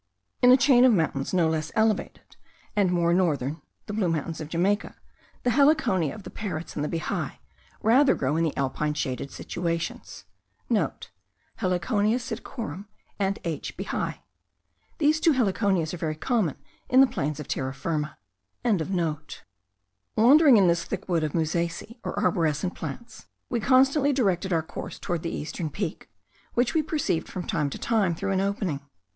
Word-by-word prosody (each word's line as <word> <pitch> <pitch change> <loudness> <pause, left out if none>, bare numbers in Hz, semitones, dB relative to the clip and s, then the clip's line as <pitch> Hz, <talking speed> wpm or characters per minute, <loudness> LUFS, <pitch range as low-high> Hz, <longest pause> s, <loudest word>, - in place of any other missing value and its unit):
In 250 0 +7
a 255 - +8
chain 250 -1 +5
of 255 - +7
mountains 160 -8 0
no 175 -3 +3
less 160 0 -1
elevated, 220 -2 0 0.4
and 200 -3 +3
more 170 -1 +2
northern 155 -5 0 0.2
(the 210 - -6
Blue 200 -4 +1
Mountains 160 0 -2
of 155 - -6
Jamaica), 190 +5 0 0.5
the 245 - +2
Heliconia 245 - +3
of 210 - -10
the - - -9
parrots 175 -6 -5
and 145 - -2
the 150 - -2
bihai, 165 - -2 0.5
rather 260 +5 +5
grow 135 +2 0
in 165 - +2
the 160 - -1
alpine 150 +2 -1
shaded 130 -1 -3
situations.* 170 +2 -4 0.3
(* - - -19 0.9
Heliconia 205 +3 +1
psittacorum, 225 - -6 0.3
and 195 0 0
H. 165 -3 -4
bihai. - - -3 0.8
These 310 +1 +3
two 320 -1 +4
heliconias 195 - +1
are - - -4
very 155 -2 -2
common 190 - 0 0.3
in 255 - +5
the - - +8
plains 150 - -3
of 150 - -7
Terra 130 0 -2
Firma.) 150 +1 -3 0.5
Wandering 160 - +1
in 195 - +5
this 170 0 +2
thick - - -5
wood 170 -3 +1
of 150 - -2
musaceae 170 +8 -2
or - - -4
arborescent 175 -4 +1
plants, 220 +10 -8 0.2
we 240 - 0
constantly 270 +4 +4
directed 195 -7 +1
our 165 -2 +2
course - - -7
towards 175 -2 -3
the 170 - -3
eastern 160 +1 -4
peak, 170 +2 -5 0.5
which 240 0 +2
we 320 - +3
perceived 295 - -1
from 180 - -5
time 150 -8 0
to - - -6
time 200 -7 +1
through 195 +4 -2
an 190 0 +1
opening. 195 -7 -1
180 Hz, 160 wpm, -26 LUFS, 155-225 Hz, 0.9 s, a